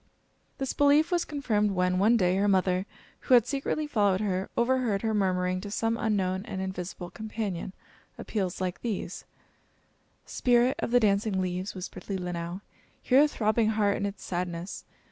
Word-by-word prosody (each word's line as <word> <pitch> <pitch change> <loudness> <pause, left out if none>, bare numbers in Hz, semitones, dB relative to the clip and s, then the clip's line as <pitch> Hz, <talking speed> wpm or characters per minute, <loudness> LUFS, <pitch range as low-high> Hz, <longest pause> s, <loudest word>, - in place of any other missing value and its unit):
This 270 -1 -2
belief 290 +3 +4
was 350 -1 +1
confirmed 225 -8 0
when, 180 0 +1
one 220 +4 +5
day, 180 -3 +2
her 200 +1 +2
mother, 185 0 +2 0.3
who 255 - +4
had 235 -2 +5
secretly 280 +3 -2
followed 205 -9 +2
her, 190 -2 -1
overheard 235 -4 +1
her 220 -1 0
murmuring 185 -2 0
to 205 - -6
some 225 +2 0
unknown 195 -4 0
and 195 - -5
invisible 180 -1 -5
companion, 215 -4 -4 0.5
appeals 190 -5 -3
like 185 -1 -3
these: 225 -5 -4 1.0
"Spirit 245 +1 +2
of - - -2
the 245 +1 +5
dancing 200 -2 +1
leaves!" 185 +1 -3
whispered 185 +2 -8
Leelinau, 180 -1 -4 0.4
"hear 265 +2 +4
a 300 - +5
throbbing 220 -4 +1
heart 210 -2 +2
in 200 - -1
its 200 0 -8
sadness. 175 0 -4
200 Hz, 160 wpm, -28 LUFS, 185-230 Hz, 1.0 s, one